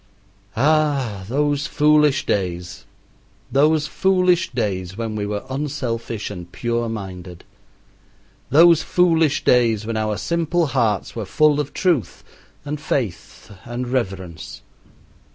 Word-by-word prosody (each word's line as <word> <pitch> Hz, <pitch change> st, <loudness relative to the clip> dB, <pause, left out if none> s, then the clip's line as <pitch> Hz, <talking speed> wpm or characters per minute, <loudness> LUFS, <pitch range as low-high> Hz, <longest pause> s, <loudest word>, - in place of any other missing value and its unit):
Ah, 140 Hz, -8 st, +1 dB
those 145 Hz, +2 st, 0 dB
foolish 150 Hz, -2 st, +3 dB
days, 90 Hz, -3 st, -3 dB, 0.6 s
those 150 Hz, +2 st, +3 dB
foolish 185 Hz, +1 st, +2 dB
days 95 Hz, -6 st, -3 dB
when 115 Hz, -2 st, -3 dB
we 105 Hz, -1 st, -2 dB
were 105 Hz, 0 st, -3 dB
unselfish 130 Hz, -6 st, -4 dB
and 90 Hz, -3 st, -9 dB
pure 120 Hz, +1 st, -2 dB
minded; 95 Hz, -5 st, -7 dB, 1.1 s
those 165 Hz, +2 st, +6 dB
foolish 165 Hz, -5 st, +2 dB
days 115 Hz, -4 st, +3 dB
when 115 Hz, 0 st, -3 dB
our 110 Hz, -1 st, -1 dB
simple 170 Hz, 0 st, 0 dB
hearts 110 Hz, -7 st, -1 dB
were 115 Hz, -, -3 dB
full 150 Hz, +7 st, +2 dB
of 145 Hz, -1 st, -3 dB
truth, 170 Hz, -, -1 dB, 0.4 s
and 150 Hz, 0 st, -4 dB
faith, 120 Hz, -, -4 dB
and 120 Hz, +1 st, -5 dB
reverence! 95 Hz, -9 st, -4 dB
125 Hz, 115 wpm, -21 LUFS, 105-150 Hz, 1.1 s, those